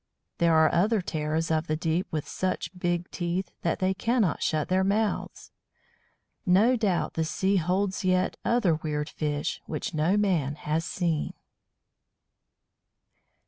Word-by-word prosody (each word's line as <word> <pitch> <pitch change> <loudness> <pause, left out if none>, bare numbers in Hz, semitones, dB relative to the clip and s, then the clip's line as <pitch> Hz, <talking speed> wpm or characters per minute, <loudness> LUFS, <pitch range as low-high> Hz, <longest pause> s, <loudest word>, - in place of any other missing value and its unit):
There 170 -1 +4
are 160 0 +5
other 210 +6 +3
terrors 160 -2 -2
of 160 +1 +1
the 155 - 0
deep 165 +4 -1
with 155 -2 -3
such 185 0 -3
big 175 -1 -2
teeth 175 +1 -2
that 170 - 0
they 185 0 +1
cannot 220 -1 +1
shut 155 -2 0
their 185 +1 +2
mouths. 210 +2 -1 0.9
No 205 +8 +4
doubt 205 -7 0
the 160 - 0
sea 190 +5 +1
holds 190 +4 0
yet 185 0 +2
other 230 -8 +2
weird 150 -1 -2
fish 150 +2 -2
which - - -4
no 160 +6 +2
man 170 -9 +1
has 155 +2 -2
seen. 170 -3 -1
175 Hz, 140 wpm, -27 LUFS, 160-190 Hz, 0.9 s, are